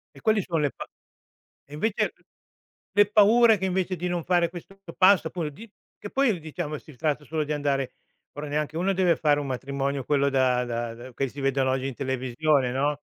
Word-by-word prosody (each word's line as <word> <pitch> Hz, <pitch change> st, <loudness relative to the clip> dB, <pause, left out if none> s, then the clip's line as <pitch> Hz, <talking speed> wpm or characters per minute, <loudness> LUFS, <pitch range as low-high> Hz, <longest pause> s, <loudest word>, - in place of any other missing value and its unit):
E -, -, -14 dB
quali 220 Hz, -3 st, +3 dB
sono 170 Hz, -3 st, -2 dB
le 145 Hz, -2 st, +1 dB
pa -, -, -8 dB, 0.8 s
e 145 Hz, -, -15 dB
invece 205 Hz, +8 st, 0 dB
l -, -, -31 dB, 0.8 s
le 205 Hz, -, +8 dB
paure 220 Hz, +1 st, +6 dB
che 190 Hz, -, -1 dB
invece 185 Hz, 0 st, -1 dB
di 180 Hz, +1 st, -3 dB
non 175 Hz, -2 st, -2 dB
fare 175 Hz, -2 st, +2 dB
questo 175 Hz, +3 st, -11 dB, 0.2 s
passo 185 Hz, -3 st, +5 dB
paura 160 Hz, -3 st, -4 dB
di 215 Hz, +10 st, -13 dB, 0.3 s
che 205 Hz, -, -7 dB
poi 260 Hz, -8 st, +2 dB
diciamo 155 Hz, -1 st, -5 dB
si 150 Hz, -2 st, -15 dB
tratta 150 Hz, +2 st, -1 dB
solo 155 Hz, 0 st, -2 dB
di 150 Hz, -, -3 dB
andare 140 Hz, -3 st, -1 dB, 0.4 s
ora 145 Hz, +1 st, -6 dB
neanche 150 Hz, +2 st, -2 dB
uno 195 Hz, +2 st, +1 dB
deve 180 Hz, -3 st, +3 dB
fare 150 Hz, -2 st, +2 dB
un 145 Hz, -, -3 dB
matrimonio 140 Hz, +1 st, -2 dB
quello 140 Hz, 0 st, +2 dB
da 130 Hz, -2 st, +2 dB
da 120 Hz, -1 st, -3 dB
da 125 Hz, +2 st, -11 dB
che 135 Hz, +1 st, -1 dB
si 140 Hz, +3 st, -9 dB
vedono 135 Hz, -1 st, +1 dB
oggi 130 Hz, 0 st, -1 dB
in 135 Hz, -, -4 dB
televisione 130 Hz, +1 st, 0 dB
no? 145 Hz, +2 st, 0 dB
150 Hz, 205 wpm, -26 LUFS, 135-180 Hz, 0.8 s, le